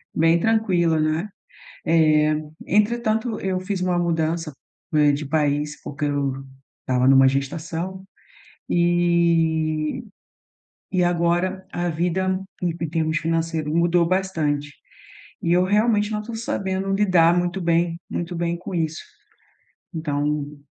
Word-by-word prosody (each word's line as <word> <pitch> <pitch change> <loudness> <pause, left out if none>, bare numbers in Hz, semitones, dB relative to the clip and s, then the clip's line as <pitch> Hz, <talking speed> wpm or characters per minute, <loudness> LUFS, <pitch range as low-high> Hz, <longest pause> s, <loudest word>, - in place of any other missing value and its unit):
bem 165 +1 +4
tranquila, 180 -6 +2
né, 155 +6 0 0.6
eh, 155 -2 +4 0.3
entretanto 220 +2 +1
eu 185 -1 -1
fiz 190 0 -3
uma 180 -1 +1
mudança, 165 -1 -1 0.4
né, 150 -1 +4
de 145 +1 -3
país 150 0 0
porque 145 +1 -5
eu 140 -1 0 0.5
estava 130 0 +1
numa 135 0 +7
gestação 165 +7 -3 0.7
e 170 0 +1 0.9
e 185 -2 +2
agora 175 +2 0
a 175 0 -2
vida 180 +3 0 0.2
em 175 - +1
em 160 - -2
termos 160 -1 0
financeiro 165 -1 -1
mudou 170 0 +3
bastante, 155 -6 -1 0.7
e 170 - 0
eu 180 +1 +4
realmente 210 +1 +2
não 210 -1 -2
tô 230 +2 -7
sabendo 195 -3 -2
lidar 180 -4 +4
muito 175 +1 -1
bem 170 0 +1
muito 175 +1 -4
bem 170 0 -1
com 180 +1 -7
isso, 160 -2 -2 0.9
então 150 -1 -2
170 Hz, 120 wpm, -23 LUFS, 155-185 Hz, 0.9 s, numa